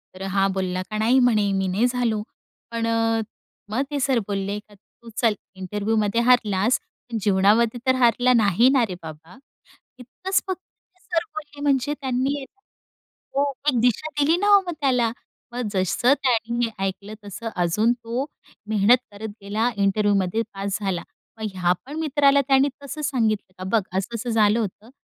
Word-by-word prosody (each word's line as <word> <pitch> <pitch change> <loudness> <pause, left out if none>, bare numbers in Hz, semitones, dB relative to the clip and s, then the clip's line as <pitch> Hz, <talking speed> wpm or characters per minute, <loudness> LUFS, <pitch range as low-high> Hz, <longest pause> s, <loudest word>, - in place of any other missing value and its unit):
तर 185 - -11
हा 195 0 +4
बोलला 185 -1 -2
का, 215 - -3
"नाही," 235 +5 +4
म्हणे, 215 -5 +3
"मी 190 0 0
नाही 200 +6 +1
झालो." 240 -4 0 0.5
पण 230 0 -1
अ, 225 0 +1 0.5
मग 235 +5 0
ते 285 - -1
सर 260 -2 +2
बोलले 200 0 -2
का, 210 0 -21
"तू 230 +3 -18
चल 230 -3 +3 0.2
इंटरव्ह्यूमध्ये 210 +3 0
हारलास, 230 -3 +3 0.3
पण 230 - -2
जीवनामध्ये 210 +4 +3
तर 260 - +5
हारला 245 0 +4
नाही 225 +2 +4
ना 255 -3 +4
रे 180 - -4
बाबा." 160 +4 -11 0.6
इतकंच 370 +10 -2
फक्त 375 -1 -3 0.4
सर 345 -2 -1
बोलले 295 -2 -8
म्हणजे 285 0 +1
त्यांनी, 265 +2 -1 0.9
तो 280 +1 +1 0.2
एक 245 -4 +1
दिशा 245 +5 +2
दिली 320 +4 +3
ना 405 +2 0
हो 400 - +5
मग 350 - -2
त्याला. 250 -4 +2 0.4
मग 245 -2 -2
जसं 195 +8 +2
त्याने 235 -2 +1
हे - - -3 0.2
ऐकलं 200 +2 -5
तसं 225 +3 -6
अजून 180 +7 +2
तो 240 +2 -4 0.4
मेहनत 215 +4 +5
करत 210 +2 -7
गेला 215 +4 0
इंटरव्ह्यूमध्ये 200 0 +2
पास 195 0 -2
झाला. 190 -3 -2 0.4
मग 220 - -2
ह्या 180 -1 +2
पण 290 +3 -8
मित्राला 280 -2 +3
त्याने 270 +1 +4
तसं 300 +2 -6
सांगितलं 225 -9 0
का, 185 - -7
"बघ, - - +2 0.2
असं 215 +5 -3
असं 235 +2 -4
झालं 220 0 +3
होतं, 215 +1 -5
230 Hz, 165 wpm, -23 LUFS, 200-255 Hz, 0.9 s, तर